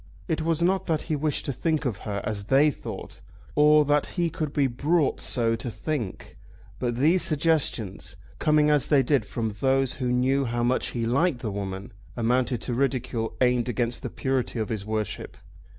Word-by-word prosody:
It 160 -3 -1
was 165 +1 0
not 190 +2 +1
that 160 -3 0
he 155 - -1
wished 150 0 -1
to 140 - -2
think 155 +3 -1
of 110 -6 -2
her 100 -1 -2
as 105 -2 -4
they 140 +6 +4
thought, - - -8 0.3
or 150 0 +5
that 145 0 +2
he 170 -2 +1
could 155 -2 -3
be 145 -1 +2
brought 145 +4 +1
so 115 -2 +2
to 115 +2 -5
think; 120 - -5 0.4
but 120 -2 -1
these 160 +9 +3
suggestions, 150 - +1 0.2
coming 150 -1 +3
as 145 -3 +2
they 140 -3 +4
did 130 -5 +1
from 110 -3 -3
those 135 -1 +2
who 125 -1 0
knew 130 +2 +2
how 120 0 -1
much 125 +2 +1
he 115 -2 -3
liked 130 +2 +1
the 110 - -3
woman, 100 0 -5 0.2
amounted 120 0 +1
to 125 - -3
ridicule 125 -3 -1
aimed 125 -1 +2
against 120 0 -1
the - - -4
purity 130 -2 -2
of 110 -2 -2
his 105 -2 -4
worship. 110 -2 -4
130 Hz, 185 wpm, -26 LUFS, 115-150 Hz, 0.4 s, or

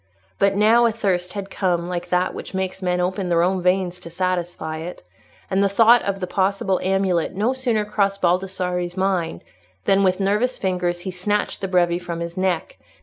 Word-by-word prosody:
But 195 0 +3
now 225 +3 +5
a - - +1
thirst 185 -5 -1
had 200 -1 -6
come 175 -3 0
like 175 -1 -4
that 180 0 +1
which - - -7
makes 190 0 -3
men 180 -1 0
open 185 +1 -1
their 170 -1 +3
own 185 +1 +1
veins 180 0 +1
to 175 - -10
satisfy 175 -3 -2
it, 170 - -7 0.4
and 195 +1 +1
the 200 - +3
thought 230 +4 +6
of 195 -1 -2
the 185 - -2
possible 190 +1 0
amulet 190 -3 0
no 220 +6 +1
sooner 240 -5 0
crossed 200 -1 0
Baldassarre's 180 0 -1
mind 185 - -1 0.4
than 195 0 +4
with 185 0 +2
nervous 210 +6 +1
fingers 180 -2 -1
he 185 - -4
snatched 205 +4 -1
the 195 - -1
breve 175 -1 +2
from 170 -1 -5
his 170 0 -5
neck. 190 - -1
185 Hz, 190 wpm, -22 LUFS, 180-200 Hz, 0.4 s, thought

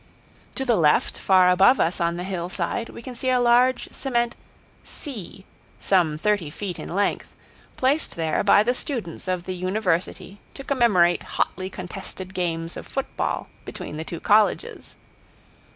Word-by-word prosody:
To 265 - -3
the 240 -3 +3
left, 150 -3 +3
far 185 -1 +5
above 195 +8 +5
us 170 +2 +1
on 170 0 0
the 175 - -4
hillside, 185 +3 -3
we - - -10
can 255 - -7
see 255 +2 -2
a 255 -1 +3
large 245 +1 +3
cement 240 -3 -1 0.5
"C" 205 - -7 0.3
some 170 -6 +2
thirty 205 -2 0
feet 180 +3 -6
in - - -7
length, 200 +4 -1 0.5
placed 275 +5 +1
there 160 -2 0
by 205 0 +6
the 245 +3 +1
students 230 - -5
of 185 -1 -1
the 185 - -4
university 185 0 -2 0.2
to 275 - -8
commemorate 210 -11 +3 0.2
hotly 185 +1 -1
contested 190 0 -7
games 165 -2 -2
of - - -8
football 270 - -3 0.2
between 150 - -7
the 160 - -4
two 165 0 -6
colleges. 210 0 +1
190 Hz, 150 wpm, -24 LUFS, 175-235 Hz, 0.5 s, by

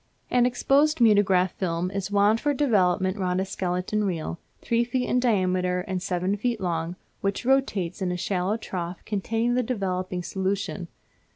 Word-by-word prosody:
An 245 0 +4
exposed 280 +5 +2
mutograph 200 -5 +4
film 175 0 -2
is 195 0 -3
wound 205 +2 +3
for 290 -1 +1
development 190 -7 +2
round 180 -1 0
a 190 - 0
skeleton 185 +3 -2
reel, 170 -3 -3 0.2
three 235 0 +1
feet 250 +1 -1
in 250 - +2
diameter 185 -6 +1
and 185 0 -3
seven 185 +3 -1 0.2
long, 170 -2 -2 0.2
which 200 +4 -2
rotates 215 -9 +1
in 185 -1 0
a 180 - -2
shallow 190 +3 -1
trough 180 -5 -6
containing 225 +3 0
the 250 - +2
developing 185 -6 -2
solution. 190 -1 -2
195 Hz, 155 wpm, -26 LUFS, 180-225 Hz, 0.2 s, An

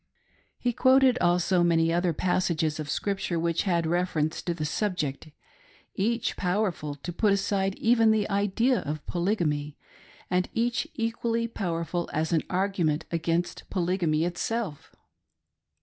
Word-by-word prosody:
He 245 -1 -1
quoted 260 0 +4
also 175 +1 +2
many 165 -1 +3
other 175 0 +2
passages 165 -2 0
of 150 -2 -5
Scripture 195 -2 -1
which 170 +2 0
had 170 -2 +1
reference 160 -2 0
to 175 - -2
the 155 -2 -3
subject; 155 -5 -2 0.4
— - - -28 0.2
each 230 +4 0
powerful 180 -6 -1
to 170 +5 -7
put 210 +3 +2
aside 195 -1 0
even 230 -1 +3
the 215 -1 +2
idea 205 +5 +1
of 150 +1 -5
polygamy; 165 -6 -1 0.5
and 180 0 0
each 240 +6 0
equally 230 -1 -1
powerful 175 -5 -3
as 160 +2 0
an 160 - +3
argu 190 0 0
ment 155 -1 0
against 165 +1 -1
polygamy 170 -3 +1
itself. 180 -1 -3
180 Hz, 135 wpm, -27 LUFS, 165-210 Hz, 0.5 s, quoted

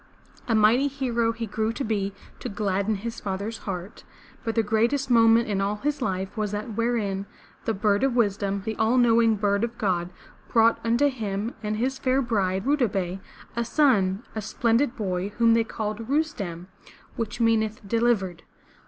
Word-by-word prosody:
A 230 - +2
mighty 220 +6 +4
hero 245 -5 0
he 230 0 -4
grew 220 +1 -1
to 275 - -3
be 205 -3 -1 0.3
to - - -5
gladden 200 +1 0
his 225 +3 -5
father's 200 +3 -4
heart, 185 +2 -6 0.4
but 225 -3 -2
the 225 - +3
greatest 235 +6 +1
moment 230 0 +5
in 200 -2 0
all 200 +1 0
his 285 +6 -2
life 190 -4 -2
was 215 -2 -1
that 210 +2 -4
wherein 210 -4 -1 0.4
the 225 - +1
Bird 205 +2 +1
of 270 -3 +2
Wis 210 -5 +3
dom, 200 -1 -2
the 220 - -2
all 225 +3 +2
knowing 230 -2 +4
Bird 200 0 +1
of 235 0 -3
God, 180 -4 0 0.4
brought 230 0 +4
unto 235 +5 +3
him 220 -4 -3
and 215 0 -2
his 265 +4 -1
fair 260 0 +2
bride 195 -6 0
Ru 290 +2 +3
da 250 -5 +3
beh', 190 -2 -3 0.4
a 235 - 0
son, 230 -7 +2
a 220 - -3
splendid 235 +4 +1
boy 190 -4 -2
whom 230 -1 +5
they 230 0 +4
called 220 0 -4
Rus'tem, 220 - -1 0.5
which 230 0 -4
meaneth 220 -2 +1
"delivered.'' 205 -6 +1
220 Hz, 180 wpm, -25 LUFS, 200-235 Hz, 0.5 s, moment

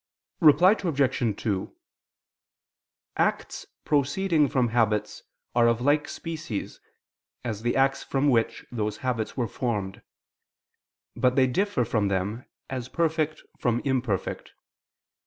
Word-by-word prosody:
Reply 165 +3 +7
Obj. 130 - 0
2: 100 -4 -2 1.4
Acts - - -1 0.2
proceeding 150 +2 +2
from 130 -4 +1
habits 110 -2 0 0.3
are 120 -1 +5
of 115 0 +2
like 145 +4 +2
species 160 - -5 0.7
as 110 -3 -3
the 120 +1 0
acts 135 0 +2
from 135 +1 0
which 115 -4 +1
those 105 -3 -2
habits 120 -2 -2
were 120 -3 0
formed: 105 -5 -3 1.1
but 125 0 +2
they 130 - +5
differ 135 - 0
from 110 -3 0
them 100 +5 -2 0.2
as 130 -2 -5
perfect 160 -2 -1 0.2
from 120 -1 +1
imperfect. 125 - -2
125 Hz, 115 wpm, -26 LUFS, 110-145 Hz, 1.4 s, Reply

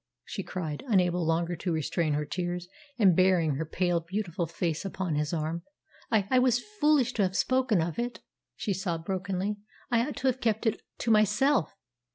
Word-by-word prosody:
she 195 - -4
cried, 160 -6 -5
unable 180 -5 +2
longer 165 +2 0
to 170 +2 -3
restrain 160 0 0
her 150 +1 -1
tears, 175 +2 -3 0.3
and 195 -7 +5
burying 180 -4 +4
her 160 - -2
pale, 175 +1 +1
beautiful 170 -1 -3
face 165 -1 -2
upon 190 -3 -3
his 150 0 0
arm. 165 0 -2 0.5
"I 215 -4 +2
I 255 - +5
was 250 -1 +3 0.2
foolish 295 -5 +4
to 215 - 0
have 190 -1 +1
spoken 255 -9 +2
of 170 +5 -4
it," 240 +1 -3 0.4
she 205 - -2
sobbed 170 -3 -3
brokenly: 195 +2 -2 0.3
"I 235 +1 +3
ought 295 - -5
to 265 - -1
have 260 0 +1
kept 220 0 0
it 220 - +1 0.2
to 230 - 0
myself. 215 - +3
185 Hz, 185 wpm, -29 LUFS, 170-220 Hz, 0.5 s, and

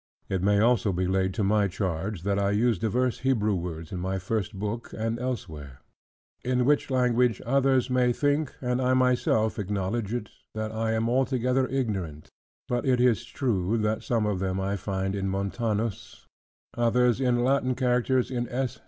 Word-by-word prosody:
It 95 -2 -1
may 100 +1 +3
also 110 -2 +3
be 90 0 -1
laid 95 +1 +1
to 110 - 0
my 100 +1 +3
charge, 95 0 -3
that 100 0 0
I 100 0 +1
use 115 -3 +2
divers 120 +4 0
Hebrew 115 -6 +1
words 85 -3 -5
in 90 - -4
my 95 +2 -2
first 100 +1 -3
book, 105 +4 -4
and 115 +1 -2
elsewhere: 80 - -5 0.6
in 125 0 +1
which 145 +1 +2
language 125 -3 +2
others 135 0 +2
may 125 -1 +2
think 145 +3 0
and 125 0 0
I 130 0 +2
myself 125 -4 +2
acknowledge 100 +2 -2
it, 120 -3 -4 0.2
that 110 0 -3
I 110 0 -1
am 110 +1 0
altogether 130 +1 +1
ignorant: 95 - -3 0.4
but 120 -1 -1
it 130 -2 +2
is 120 -2 +3
true, 110 -5 -1
that 110 0 0
some 115 -3 0
of 105 -3 -1
them 95 0 -1
I 100 +1 -1
find 95 -1 -2
in 95 -1 -2
Montanus, 105 +2 -3 0.5
others 120 +1 +2
in 120 -2 +2
Latin 130 -1 +1
characters 125 0 +1
in 120 -2 -2
S. 130 0 -3
115 Hz, 170 wpm, -27 LUFS, 100-125 Hz, 0.6 s, may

